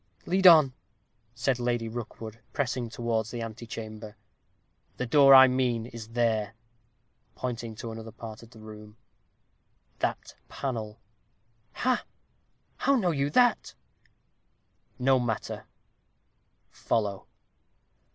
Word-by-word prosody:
"Lead 190 +1 +4
on!" 155 -6 +7 0.6
said 125 +1 0
Lady 120 -1 -1
Rookwood, 115 -1 -7
pressing 125 -4 -2
towards 115 -1 -2
the 120 -1 -5
antechamber. 110 -1 -8 0.8
"The 125 - -2
door 135 +2 +7
I 130 0 +10
mean 125 -3 0
is 115 -2 -9
there," 115 -2 0 0.8
pointing 115 -3 -5
to 115 +1 -7
another 110 0 -8
part 110 0 -9
of 115 - -14
the 115 - -17
room 105 0 -12 1.0
"that - - -3 0.2
panel, 110 -5 -4 0.4
" 110 +2 -42
"Ha! 255 -1 +2 0.7
how 275 - +2
know 190 -9 +1
you 140 -2 0
that?" 245 +8 +2 1.2
"No 130 +1 +3
matter; 120 -3 -3 1.1
follow." 100 -3 -2
115 Hz, 110 wpm, -28 LUFS, 110-130 Hz, 1.2 s, I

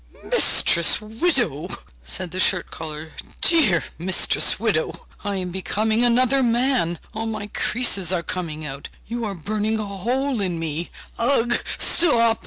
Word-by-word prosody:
'Mistress 170 -1 +4
widow!' 220 - 0 0.3
said 170 - -3
the 185 - -4
shirt 185 -2 +2
collar, 155 0 -7 0.3
'dear 280 - +4 0.2
mistress 180 +2 +3
widow! - - -1 0.2
I 205 -1 -2
am 180 -2 -4
becoming 215 +5 0
another 255 +3 +3
man, 240 -7 +1 0.2
all 225 +1 -4
my 215 -2 -4
creases 200 -7 +1
are 175 -2 -1
coming 160 -4 -5
out; 140 -1 -7 0.2
you 235 0 -4
are 200 -2 -4
burning 215 +5 -2
a 215 - -3
hole 240 +6 -2
in 180 -3 -1
me! 165 +1 -4 0.3
Ugh! 240 -1 +2
205 Hz, 135 wpm, -22 LUFS, 170-235 Hz, 0.3 s, Mistress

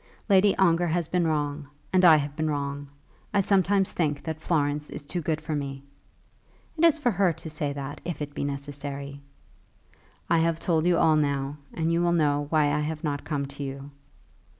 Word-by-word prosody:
Lady 195 0 +5
Ongar 175 -2 +3
has 170 0 0
been 175 -1 +1
wrong, 145 -2 -2 0.3
and 185 0 +4
I 165 -3 +9
have 145 -1 -1
been 155 0 -1
wrong. 145 -1 -3 0.5
I - - +5
sometimes 195 0 +2
think 150 -4 -1
that 160 -1 -5
Florence 150 -3 0
is - - -8
too 175 +4 -3
good 155 0 -1
for 155 0 -5
me." 135 -1 -4 0.9
"It 325 - -2
is 330 -2 +6
for 265 -6 +1
her 190 -2 +2
to 160 - -9
say 150 -2 -2
that, 140 0 -6
if 175 -1 -4
it 145 -1 -5
be - - -3
necessary." 140 0 -5 1.1
"I 170 - +3
have 165 0 +1
told 165 -1 +1
you 175 -1 +4
all 160 -2 +4
now, 140 -1 -1
and 165 0 -1
you 170 - +2
will 175 0 +2
know 145 -3 +1
why 150 -2 +3
I 150 - +1
have 155 +1 -3
not 145 -2 -2
come 145 -3 -2
to 140 +1 -10
you." 140 +1 -7
155 Hz, 195 wpm, -26 LUFS, 145-170 Hz, 1.1 s, I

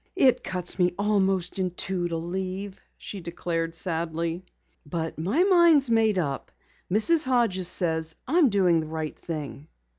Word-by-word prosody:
"It 265 -9 +4
cuts 180 0 -2
me 175 -1 +2
almost 195 -3 +1
in 185 -1 0
two 180 0 -2
to 165 -1 -3
leave," 190 +3 -5 0.2
she 200 - -8
declared 165 -1 -3
sadly, 165 0 -2 0.4
"but 160 +1 -4
my 205 - +2
mind's 340 -9 +5
made 220 -3 +3
up. 140 -6 -3 0.4
Mrs. 300 - +3
Hodges 230 -8 +1
says 160 -3 0
I 325 +7 +2
am 295 -7 +5
doing 185 -5 +3
the 155 - -4
right 155 -1 -4
thing." 150 -2 -7
180 Hz, 150 wpm, -26 LUFS, 165-210 Hz, 0.4 s, mind's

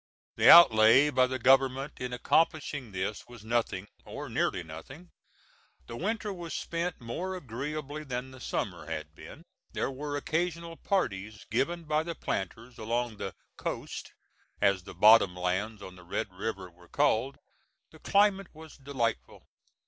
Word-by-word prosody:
The - - +5
outlay 130 -2 +8
by 130 -2 +3
the 130 0 -3
government 135 +2 +3
in 125 0 -4
accomplishing 145 -1 0
this 95 +2 -4
was 120 -3 -13
nothing, 110 -4 -1 0.2
or - - -7
nearly 90 - 0
nothing. 110 - -11 0.7
The 115 - -8
winter 210 - -2
was 170 -4 -6
spent 170 0 -3
more 170 +11 -4
agreeably 150 +1 -5
than 130 -1 -5
the 130 - -12
summer - - -4
had 75 0 -5
been. - - -12 0.3
There - - -1
were 145 +2 -4
occasional 170 +2 -2
parties 105 - -2
given 170 +9 0
by 155 0 +1
the 165 +1 -5
planters 115 +4 -5
along 115 0 -2
the 95 - -5 0.2
"coast" - - -5 0.5
as 100 -3 +2
the - - -10
bottom 105 -4 +6
lands 95 +4 -2
on 95 0 -10
the 90 - -14
Red 90 +2 -4
River 95 -1 -5
were 90 0 -21
called. 130 +5 +1 0.5
The - - -16
climate 200 -1 +3
was 160 0 -12
delightful. 130 -5 -3
125 Hz, 150 wpm, -29 LUFS, 105-155 Hz, 0.7 s, outlay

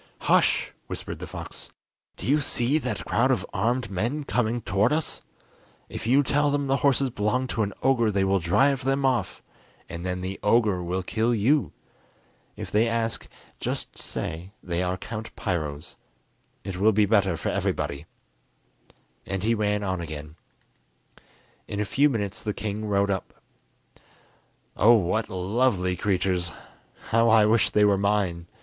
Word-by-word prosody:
"Hush!" - - +3 0.2
whispered - - -6
the - - -6
fox, - - -9 0.5
"do - - -7
you 145 +3 +3
see 135 +2 +1
that - - -4
crowd - - +2
of - - +1
armed 115 +3 0
men 120 +11 -1
coming 120 -3 0
towards 105 +7 +2
us? 160 - -3 0.7
If - - -6
you 135 +4 +5
tell 145 +2 +2
them 145 0 0
the 135 0 +1
horses 140 -2 +2
belong 110 +5 0
to 115 - -1
an 100 -1 0
ogre 125 -4 +3
they 100 -2 +1
will 95 0 +2
drive 135 +11 +2
them 135 +1 +1
off, 130 -2 0 0.4
and 85 +1 -7
then 90 0 -3
the 95 +1 -5
ogre 105 -4 +3
will 90 +2 -2
kill 115 +5 0
you! 110 - +2 0.8
If - - -7
they 110 +3 +3
ask, 115 -1 -1 0.3
just - - -3
say 85 +5 -6
they 85 -1 -2
are 90 0 -1
Count 110 +3 -7
Piro's; 75 -6 -4 0.7
it 95 -2 -5
will 105 +3 +4
be 105 +1 +4
better 100 -4 +2
for - - -2
everybody." 70 +3 -2 1.2
And 95 -1 -3
he 115 +2 +2
ran 105 -2 0
on 95 -3 -2
again. 75 -1 -7 1.3
In 100 - -4
a 105 - 0
few 145 +8 +3
minutes 105 -5 -2
the 105 - -3
king 105 +1 -4
rode 100 -1 +1
up. 95 - -4 1.4
"Oh, 115 +4 +6
what 110 +2 0
lovely 95 0 +1
creatures! 90 -2 0 0.6
how 115 +1 +4
I 110 -1 +6
wish 110 +1 +3
they 105 0 +4
were 100 -1 +3
mine!" 100 -4 0
105 Hz, 155 wpm, -26 LUFS, 95-120 Hz, 1.4 s, Oh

